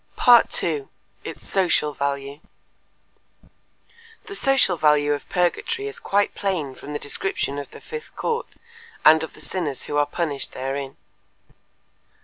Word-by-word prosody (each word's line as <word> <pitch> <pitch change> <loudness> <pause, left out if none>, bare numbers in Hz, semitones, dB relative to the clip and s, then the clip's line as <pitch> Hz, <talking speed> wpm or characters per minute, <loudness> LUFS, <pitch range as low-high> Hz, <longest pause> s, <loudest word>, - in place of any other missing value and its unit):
2. 150 -5 -1 0.3
Its - - -8
Social 175 -6 +2
Value 140 0 -3 1.9
The 410 - -8
social 270 - +3
value 150 -2 +3
of 145 - -6
purgatory 180 - 0
is 425 +3 -7
quite 205 - +1
plain 180 -9 -2
from 145 +3 -9
the - - -1
description 145 -1 -1
of 140 - -7
the - - -12
fifth 460 0 -8
court 465 +1 -2 0.6
and 160 0 +8
of 160 - -5
the - - -15
sinners 160 -8 -3
who 145 - -3
are 145 0 +3
punished 150 -3 -3
therein. 135 +1 -4
150 Hz, 130 wpm, -23 LUFS, 140-195 Hz, 1.9 s, and